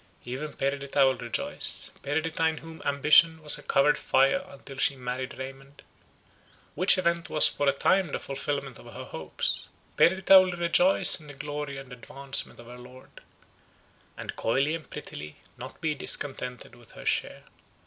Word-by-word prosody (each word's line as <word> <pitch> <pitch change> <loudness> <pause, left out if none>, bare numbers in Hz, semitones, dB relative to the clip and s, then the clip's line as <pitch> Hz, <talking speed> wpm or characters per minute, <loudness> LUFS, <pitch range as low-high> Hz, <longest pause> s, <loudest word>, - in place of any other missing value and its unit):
Even 135 +5 -6
Perdita 140 0 0
will 130 0 +2
rejoice. 120 -1 +1
Perdita, 160 +3 -1
in 160 0 -2
whom 165 0 -11
ambition 155 +3 +4
was 150 - +2
a - - -11
covered 145 +2 +2
fire 135 +7 +2
until 140 -8 -12
she 140 - +2
married 130 +1 -5
Raymond, 135 +2 -10 0.9
which 185 +1 +5
event 170 -2 -1
was 155 - +4
for 145 - 0
a - - +4
time 185 +7 +1
the 145 - -4
fulfilment 140 -1 -4
of 120 - -13
her 130 - -8
hopes; 80 -8 -4 0.3
Perdita 190 +2 +6
will 185 -2 -3
rejoice 180 +2 +4
in 155 - -15
the 145 - -11
glory 145 0 -6
and 135 -2 -10
advancement 135 +3 -4
of 120 - -12
her 125 +1 -12
lord—and, 125 +1 -15
coyly 135 +7 0
and 165 -2 -7
prettily, 75 +1 -8 0.2
not - - -10
be 155 -2 0
discontented 130 -3 -2
with 120 -2 -17
her - - -12
share. - - -1
140 Hz, 160 wpm, -27 LUFS, 130-160 Hz, 0.9 s, Perdita